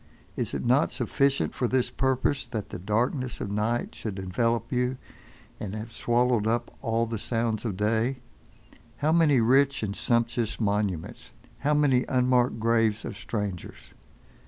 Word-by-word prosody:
Is - - -2
it - - -3
not 130 +6 +4
sufficient 140 -1 0
for 125 - 0
this 125 0 +1
purpose, 130 0 0
that 110 -4 -5
the 100 - -6
darkness 120 - -1
of 100 - -4
night 110 +4 -1
should 105 -4 -5
envelop 115 +5 -1
you, 125 0 0 0.6
and 105 0 -5
have 110 +2 -6
swallowed 120 -2 +1
up 120 +1 -1
all 115 -2 +1
the 115 -1 -4
sounds 115 0 -1
of 100 -5 -2
day? 110 +5 +1 0.8
How 150 +4 +1
many 160 -5 +4
rich 135 +3 +3
and 100 -1 -2
sumptuous 115 -1 0
monuments! 100 - -2 0.3
How 150 +1 +1
many 135 -4 +3
unmarked 125 -2 +2
graves 115 -1 +2
of - - -5
strangers! 100 -5 -5
115 Hz, 150 wpm, -27 LUFS, 110-125 Hz, 0.8 s, not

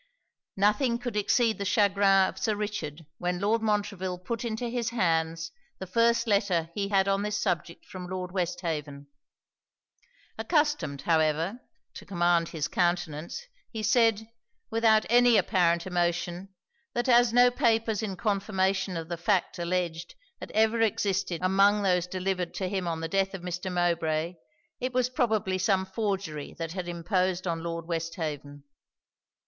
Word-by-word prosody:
Nothing 215 +5 +2
could 245 -2 -5
exceed 220 +2 +2
the - - -1
chagrin 200 -1 +4
of - - -7
Sir 215 - 0
Richard 170 -7 -5
when 180 0 -1
Lord 215 +3 +1
Montreville 205 -4 -1
put 220 +6 -4
into 235 +1 -3
his 235 -1 -2
hands 165 -6 0 0.3
the 190 - -6
first 230 +5 +2
letter 195 -6 +1
he 200 +1 -2
had 195 -1 +3
on 195 0 +1
this 210 0 -1
subject 170 -2 -2
from 180 -1 -8
Lord 185 -1 -5
Westhaven. 165 -6 -3 1.3
Accustomed, 295 - 0
however, 160 +6 +1 0.3
to - - -10
command 175 -2 +2
his 155 -3 -2
countenance, 175 - -1 0.2
he 220 -2 -5
said, 225 -2 +3 0.4
without 220 -1 +4
any 240 -1 +5
apparent 170 -4 +2
emotion, 175 +1 -1 0.5
that 240 +1 0
as 240 -1 +5
no 245 +1 +6
papers 225 -4 +1
in 205 -3 -3
confirmation 190 -1 0
of 165 -1 -5
the 170 0 -4
fact 185 +1 0
alledged 170 -1 -2 0.2
had - - -8
ever 220 +1 +3
existed 195 -5 0
among 200 +2 +4
those 180 -2 +2
delivered 185 -1 -2
to 190 - -2
him 190 -2 -2
on 165 -1 -2
the 165 - -2
death 195 +2 0
of 180 - -8
Mr. 180 +1 -4
Mowbray, 170 -2 0 0.5
it 255 0 -3
was 250 0 +1
probably 220 -7 0
some 190 0 +2
forgery 190 -6 -3
that 165 -1 -4
had 180 0 -5
imposed 180 +1 -1
on 165 -2 -2
Lord 165 0 -4
Westhaven. 160 -4 -4
190 Hz, 150 wpm, -28 LUFS, 170-215 Hz, 1.3 s, no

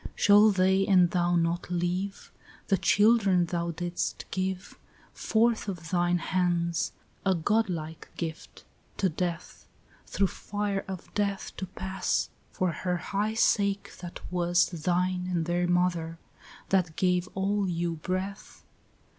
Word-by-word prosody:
3 - - -7
Shall 205 +1 +6
they 190 0 +3
and 180 -3 +5
thou 175 -1 +2
not 170 +1 0
live, 180 +3 -2 0.4
The 195 - +4
children 205 -4 +4
thou 170 0 -2
didst 175 +1 -3
give 190 0 -3 0.4
Forth 225 0 +1
of 170 -6 -6
thine 175 0 +2
hands, 170 -1 0 0.3
a 190 -1 +2
godlike 170 -4 -1
gift, 165 -2 -6 0.3
to 190 - +2
death, 170 +1 -4 0.4
Through 200 - +1
fire 205 +1 -3
of 190 -2 -8
death 200 -1 -2
to 190 - -4
pass 190 +1 -2 0.2
For 185 -2 0
her 180 +3 -2
high 205 +5 -2
sake 200 -3 +1
that 175 -1 -8
was 175 0 +2
Thine 180 +2 -1
and 170 -3 0
their 175 +1 0
mother, 175 -2 0 0.5
that 180 -5 +1
gave 180 -1 +1
all 195 0 0
you 170 -1 -2
breath? 185 +4 -5
180 Hz, 130 wpm, -28 LUFS, 175-195 Hz, 0.5 s, Shall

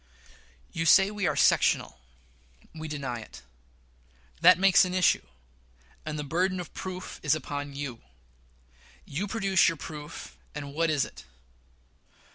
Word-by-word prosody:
You 165 0 -2
say 195 +5 +6
we 205 -3 -1
are - - 0
sectional. - - +2 0.7
We 160 -1 -7
deny 140 -5 -4
it. 105 - -12 1.0
That - - +8
makes 195 +1 +6
an 180 0 -2
issue; 185 -2 +3 0.9
and 155 -1 -3
the 150 - -3
burden 180 +6 0
of 175 - -8
proof 185 -1 -7
is 150 0 +2
upon 145 -1 -5
you. 140 -5 -5 1.0
You 180 +9 -3
produce 195 -3 +3
your 165 - -4
proof; 150 +1 -9 0.2
and 140 -1 -6
what 165 +2 +1
is 150 -4 +1
it? - - -13
160 Hz, 135 wpm, -28 LUFS, 145-185 Hz, 1.0 s, That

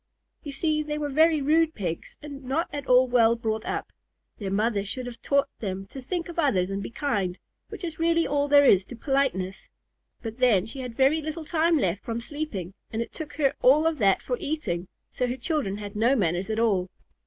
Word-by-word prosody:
You 290 - -7
see, 305 +2 0
they 300 0 -3
were 295 -1 -2
very 315 0 +4
rude 320 +2 +3
Pigs 175 -5 -5
and 285 -2 -8
not 275 +6 -1
at 285 -2 -5
all 255 +1 +6
well 235 -2 +4
brought 220 -2 -2
up. - - -3 0.5
Their 200 -3 -3
mother 205 +1 +1
should 250 +5 -5
have 235 -2 -8
taught 280 0 +2
them 195 -2 -4
to 270 - -7
think 340 +6 -3
of 345 -1 -6
others 195 - +2
and 195 0 -2
be - - -5
kind, 205 -9 -1 0.3
which - - -9
is 330 -2 -5
really 335 0 +3
all 285 0 +1
there 285 0 +6
is 195 -7 +6
to 245 - -9
politeness. 230 -8 -1 0.5
But 225 +2 -6
then, 220 -7 +4
she 250 +5 -7
had 250 -3 -6
very 275 +4 +4
little 310 +1 -5
time 330 +1 +2
left 190 - 0
from 230 0 -3
sleeping, 235 - -5 0.2
and 220 - -3
it 230 - -4
took 305 -2 -7
her 280 -3 +2
all 290 +5 +5
of 325 -3 +1
that 195 -3 +3
for 250 - -2
eating, 190 - -3 0.2
so 250 - -1
her 250 +1 -3
children 260 - -1
had 205 -1 -7
no 235 +6 +3
manners 180 -2 0
at 220 - -1
all. 200 -5 +2
255 Hz, 215 wpm, -26 LUFS, 205-300 Hz, 0.5 s, all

